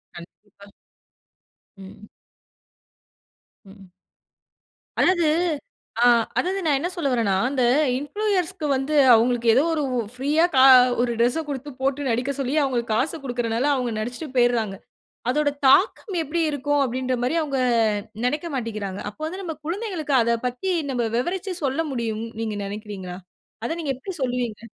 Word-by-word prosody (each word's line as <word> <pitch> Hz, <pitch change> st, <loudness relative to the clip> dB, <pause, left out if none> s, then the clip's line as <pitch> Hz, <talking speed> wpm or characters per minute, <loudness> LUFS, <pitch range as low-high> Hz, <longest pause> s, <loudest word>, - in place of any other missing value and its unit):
கண்டிப்பா. 200 Hz, +3 st, -15 dB, 1.1 s
ம். 195 Hz, +2 st, -12 dB, 1.6 s
ம். 195 Hz, -1 st, -15 dB, 1.1 s
அதாவது 345 Hz, -3 st, +3 dB, 0.8 s
ஆ -, -, +6 dB, 0.3 s
அதாவது 380 Hz, +2 st, 0 dB
நான் 295 Hz, -3 st, +3 dB
என்ன 340 Hz, -, -2 dB
சொல்ல 335 Hz, -7 st, -1 dB
வறேனா, 225 Hz, -5 st, +1 dB, 0.2 s
அந்த 265 Hz, -2 st, -1 dB, 0.4 s
இன்ஃப்ளூயர்ஸ்‌க்கு 370 Hz, +1 st, -2 dB
வந்து 270 Hz, +3 st, -2 dB, 0.2 s
அவங்களுக்கு 235 Hz, +1 st, +2 dB
ஏதோ 270 Hz, -, +4 dB
ஒரு 300 Hz, -, -1 dB, 0.3 s
ப்ரீயா 295 Hz, +5 st, +2 dB
கா 260 Hz, 0 st, +6 dB, 0.4 s
1 240 Hz, -1 st, 0 dB
டிரெஸ்‌ச 245 Hz, +7 st, +2 dB
குடுத்து, 285 Hz, +1 st, -5 dB
போட்டு 270 Hz, +1 st, 0 dB
நடிக்க 245 Hz, +4 st, 0 dB
சொல்லி 275 Hz, +1 st, -1 dB
அவங்களுக்கு 240 Hz, -4 st, -1 dB
காச 260 Hz, +8 st, +1 dB
கொடுக்குறனால 240 Hz, -1 st, -1 dB
அவங்க 250 Hz, -3 st, -1 dB
நடிச்சுட்டு 245 Hz, +8 st, -5 dB
போயிறாங்க. 235 Hz, -5 st, +2 dB, 0.5 s
அதோட 295 Hz, +2 st, +2 dB, 0.2 s
தாக்கம் 380 Hz, -, +3 dB
எப்டி 320 Hz, +3 st, -2 dB
இருக்கும் 290 Hz, 0 st, 0 dB
அப்டின்ற 255 Hz, 0 st, -1 dB
மாரி 255 Hz, +6 st, 0 dB
அவங்க 275 Hz, -4 st, -2 dB, 0.7 s
நெனைக்க 300 Hz, +6 st, -1 dB
மாட்டிக்கிறாங்க. 215 Hz, -5 st, -4 dB
அப்ப 210 Hz, -, -18 dB
வந்து 365 Hz, +5 st, -5 dB
நம்ம 325 Hz, -3 st, -4 dB
குழந்தைகளுக்கு 345 Hz, -6 st, -2 dB
அத 235 Hz, 0 st, +1 dB
பத்தி, 250 Hz, +10 st, -3 dB, 0.2 s
நம்ம 240 Hz, -3 st, 0 dB
விவரிச்சி 370 Hz, +8 st, -2 dB
சொல்ல 275 Hz, +3 st, 0 dB
முடியும்னு 230 Hz, -3 st, -3 dB
நீங்க 215 Hz, -2 st, -3 dB
நெனைக்கிறீங்களா? 200 Hz, -3 st, -7 dB, 0.5 s
அத -, -, -2 dB
நீங்க 295 Hz, -4 st, -2 dB
எப்டி 380 Hz, +9 st, -7 dB
சொல்லுவீங்க? 245 Hz, -4 st, -2 dB
260 Hz, 135 wpm, -23 LUFS, 230-305 Hz, 1.6 s, ஆ